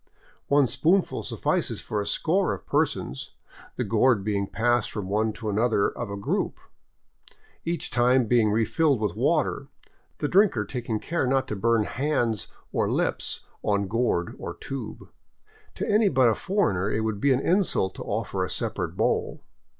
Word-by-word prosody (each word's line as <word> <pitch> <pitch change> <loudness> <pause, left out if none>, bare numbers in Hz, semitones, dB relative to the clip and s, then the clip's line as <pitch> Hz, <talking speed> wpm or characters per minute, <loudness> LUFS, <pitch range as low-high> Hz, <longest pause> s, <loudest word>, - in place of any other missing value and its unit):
One 145 -1 +4
spoonful 175 +9 +1
suffices - - -1
for 105 -1 -3
a 100 - -5
score 180 - +1
of 90 - -14
persons, 65 - -1 0.4
the - - -1
gourd 110 0 +3
being 100 -1 -1
passed 120 +1 +1
from 100 -3 -5
one 110 +2 +1
to 110 - -7
another 105 0 +2
of 120 -3 -6
a 100 - -4
group, 100 - -1 1.1
each 170 +1 -2
time 125 +1 +3
being 115 -1 +3
refilled 125 +6 +2
with 105 -5 -1
water, - - +1 0.5
the 145 - -1
drinker 180 - +3
taking 120 -4 -3
care 165 -1 -1
not 135 +1 +1
to 105 - -2
burn 115 +2 +2
hands 120 -3 -1 0.2
or - - 0
lips - - -1 0.2
on 100 -1 0
gourd 110 -5 0
or - - -6
tube. 135 -5 -7 0.7
To - - -3
any 210 0 +4
but 130 -5 +4
a - - +3
foreigner 105 - 0
it 110 - 0
would 110 -2 -2
be 140 - +3
an 130 - +3
insult 170 - +1
to - - -7
offer - - -2
a - - -3
separate - - -3
bowl. - - 0
115 Hz, 165 wpm, -26 LUFS, 105-140 Hz, 1.1 s, One